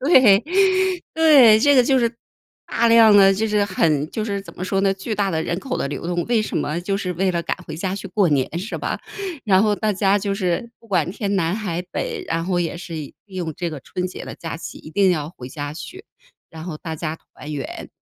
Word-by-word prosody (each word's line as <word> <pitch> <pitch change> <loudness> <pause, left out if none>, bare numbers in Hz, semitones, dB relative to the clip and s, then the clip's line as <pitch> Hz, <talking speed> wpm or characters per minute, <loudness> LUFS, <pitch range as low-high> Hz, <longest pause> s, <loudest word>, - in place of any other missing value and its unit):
对， 255 - +6 0.7
对， 280 -9 +7
这 285 +2 +5
个 250 - +6
就 265 0 +3
是 235 -1 0 0.5
大 235 0 +1
量 225 -2 +7
的， 195 -1 +7
就 220 +3 0
是 210 -1 +2
很 155 -6 +1
就 215 - -3
是 200 -2 -2
怎 - - -13
么 185 - -4
说 195 0 0
呢， 195 0 +3
巨 195 +3 -4
大 200 -1 0
的 160 -2 -1
人 170 +2 -2
口 260 -2 -3
的 - - -2
流 145 - -5
动， 175 -1 -1
为 230 -2 +2
什 - - -4
么？ 155 +4 -1
就 195 +2 -1
是 185 -3 -3
为 190 +2 +1
了 170 -1 -1
赶 - - -2
回 155 - -6
家 185 +3 -2
去 195 -1 -7
过 195 -1 +2
年， 145 +3 0
是 200 +5 -5
吧？ - - -3 0.4
然 195 -1 +4
后 210 -1 +3
大 215 0 0
家 195 +1 +2
就 200 0 -2
是 195 +4 -2
不 230 - -19
管 175 -4 +1
天 200 0 -2
南 170 -1 +1
海 180 -5 -3
北， - - -3
然 165 +1 -1
后 180 -1 0
也 170 0 -2
是 170 -1 -8
利 150 -3 -7
用 185 -5 -4
这 175 -2 -3
个 150 - -7
春 180 +7 -4
节 185 - -8
的 - - -7
假 165 - -6
期， 165 - -8
一 - - -12
定 190 +3 +3
要 155 -3 -1
回 130 -7 -10
家 145 +1 -5
去， 370 - -9 0.5
然 160 0 -9
后 170 -3 -5
大 160 -1 -6
家 160 0 -4
团 150 -1 -11
圆。 140 -4 -6
190 Hz, 260 characters per minute, -21 LUFS, 165-210 Hz, 0.7 s, 对